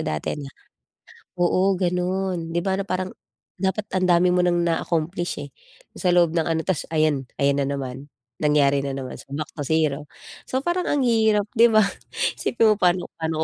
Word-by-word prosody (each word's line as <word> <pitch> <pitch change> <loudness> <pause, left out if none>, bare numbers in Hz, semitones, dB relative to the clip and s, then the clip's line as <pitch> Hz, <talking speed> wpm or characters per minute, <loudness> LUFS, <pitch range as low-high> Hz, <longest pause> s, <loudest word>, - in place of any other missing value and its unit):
dati 75 -1 -2
na 140 - -7 0.9
oo, 185 +2 +2
gano'n. 180 -1 -1
Di 170 - -1
ba 190 - +1
na 195 - -1
parang 185 -1 -3 0.4
dapat 190 +3 -2
ang 185 -1 +2
dami 180 +1 +4
mo 180 - +3
ng 175 -1 +2
na-accomplish, 170 +1 -1
eh. - - -13 0.5
Sa 180 - 0
loob 175 -2 +3
ng 165 -2 +2
ano, 160 -1 +1
ta's 190 -5 0
ayan, 155 -3 +2 0.2
ayan 140 0 +3
na - - 0
naman, 135 0 -5 0.3
nangyari 140 -2 +2
na 140 - -2
naman, 135 -1 -6
so - - -14
back 150 +2 -3
to 145 - -3
zero. 150 -1 0 0.4
So 260 - -2
parang, 345 +5 -1
ang 290 - +1
hirap, 220 -4 +2
di 230 - +7
ba? 215 - +6 0.6
Isipin 225 -2 +3
mo - - +6
paano 180 -1 +1
paano 160 -1 -1
175 Hz, 185 wpm, -23 LUFS, 150-190 Hz, 0.9 s, di